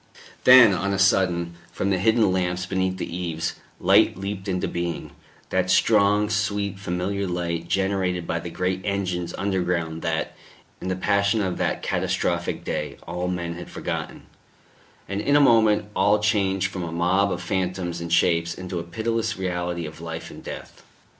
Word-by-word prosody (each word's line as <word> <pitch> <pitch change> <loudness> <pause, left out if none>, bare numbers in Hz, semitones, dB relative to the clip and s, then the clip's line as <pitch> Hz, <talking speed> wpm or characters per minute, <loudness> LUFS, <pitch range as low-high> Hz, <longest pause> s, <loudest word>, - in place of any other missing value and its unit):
Then, 125 -5 +9
on 100 +2 -1
a - - 0
sudden, 90 -3 +2 0.2
from 100 - -1
the 95 - +1
hidden 110 0 +3
lamps 90 0 -1
beneath 95 0 -1
the 85 - -5
eaves, 85 -2 -2 0.3
light - - +4
leaped 100 0 -5
into 90 -2 -1
being 85 -1 -4 0.4
that - - +1
strong, 105 +1 +4
sweet, 100 -2 -1
familiar 95 +2 -2
light, 85 -1 -3
generated 95 -2 0
by 85 - -1
the 85 - -6
great 90 +2 -2
engines 90 -4 -2
underground 90 -4 -1
that, 80 -1 -2 0.5
in - - -5
the 95 - 0
passion 100 +3 +2
of 95 -3 -2
that - - -1
catastrophic - - -1
day, - - -3
all 90 0 -3
men 85 -2 -3
had 85 +1 -9
forgotten; - - -5 0.8
and 100 +1 -2
in 140 +5 +2
a - - +7
moment 110 -6 +4
all 105 +1 +4
changed 95 -3 +1
from 95 - -5
a 85 -2 -4
mob 90 +4 +2
of 90 - -2
phantoms 90 -1 -2
and 85 0 -5
shapes 85 0 +2
into 90 -1 -5
a - - -4
pitiless 115 +5 -2
reality 90 -2 -2
of 75 +1 -9
life 80 0 -6
and - - -11
death. - - -9
95 Hz, 165 wpm, -24 LUFS, 85-100 Hz, 0.8 s, Then